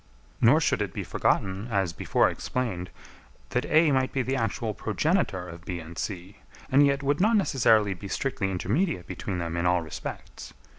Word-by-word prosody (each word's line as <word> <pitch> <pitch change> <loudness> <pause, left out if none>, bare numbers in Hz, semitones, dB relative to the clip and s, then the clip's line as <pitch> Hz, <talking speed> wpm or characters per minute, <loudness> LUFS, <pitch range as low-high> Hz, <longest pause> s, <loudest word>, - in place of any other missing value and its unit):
Nor 125 +7 +6
should 150 - +1
it 100 -4 -2
be - - -3
forgotten, 95 +3 0
as 95 -6 0
before - - +2
explained, 95 -9 -3 0.6
that 125 - 0
A 155 -1 +4
might 130 -1 +1
be 135 - 0
the 130 +2 -1
actual 115 -2 -1
progenitor 110 - 0
of 85 -1 -10
B 90 -1 -4
and 80 +1 -10
C, 95 +1 -5 0.3
and 140 +2 +6
yet 140 0 +2
would 145 +4 +1
not 220 +3 +4
necessarily 110 - +3
be 95 +2 -9
strictly 105 -1 -2
intermediate 100 - -1
between 95 -3 -5
them 85 -1 -3
in 85 +1 0
all 90 -1 +2
respects. 80 - -8
105 Hz, 180 wpm, -27 LUFS, 90-135 Hz, 0.6 s, Nor